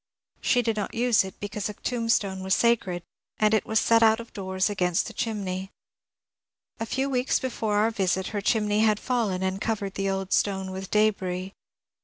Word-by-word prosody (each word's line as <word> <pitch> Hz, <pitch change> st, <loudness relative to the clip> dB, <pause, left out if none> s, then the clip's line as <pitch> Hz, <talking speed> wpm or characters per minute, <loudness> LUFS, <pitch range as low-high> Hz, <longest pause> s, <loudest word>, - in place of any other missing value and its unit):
She 245 Hz, -1 st, +2 dB
did 225 Hz, -1 st, -1 dB
not 205 Hz, -, -3 dB
use 240 Hz, -2 st, +3 dB
it 190 Hz, -, -9 dB
becanae 205 Hz, 0 st, -4 dB
a -, -, -5 dB
tombstone 230 Hz, -5 st, -1 dB
was 190 Hz, +1 st, +2 dB
sacred, 195 Hz, -7 st, +1 dB, 0.3 s
and 215 Hz, 0 st, +3 dB
it 220 Hz, -, +1 dB
was 220 Hz, 0 st, +3 dB
set 230 Hz, 0 st, +4 dB
oat 220 Hz, 0 st, +5 dB
of 230 Hz, -, -10 dB
doors 190 Hz, -1 st, -1 dB
against 180 Hz, -4 st, 0 dB
the -, -, -7 dB
chinmey. 195 Hz, -4 st, -3 dB, 1.1 s
A 225 Hz, -, -3 dB
few 270 Hz, +3 st, -1 dB
wedcs 255 Hz, -1 st, +1 dB
before 225 Hz, -5 st, -1 dB
oar 225 Hz, -, +2 dB
visit 190 Hz, -3 st, 0 dB
her 205 Hz, -2 st, -3 dB
chinmey 210 Hz, 0 st, +1 dB
had 215 Hz, -1 st, +3 dB
fallen 220 Hz, -8 st, -1 dB
and 190 Hz, +1 st, -2 dB
covered 205 Hz, -3 st, -2 dB
the 195 Hz, 0 st, -1 dB
old 195 Hz, 0 st, -2 dB
stone 190 Hz, -2 st, 0 dB
with 190 Hz, 0 st, -6 dB
d^ris. 195 Hz, -3 st, +1 dB
205 Hz, 185 wpm, -26 LUFS, 190-225 Hz, 1.1 s, oat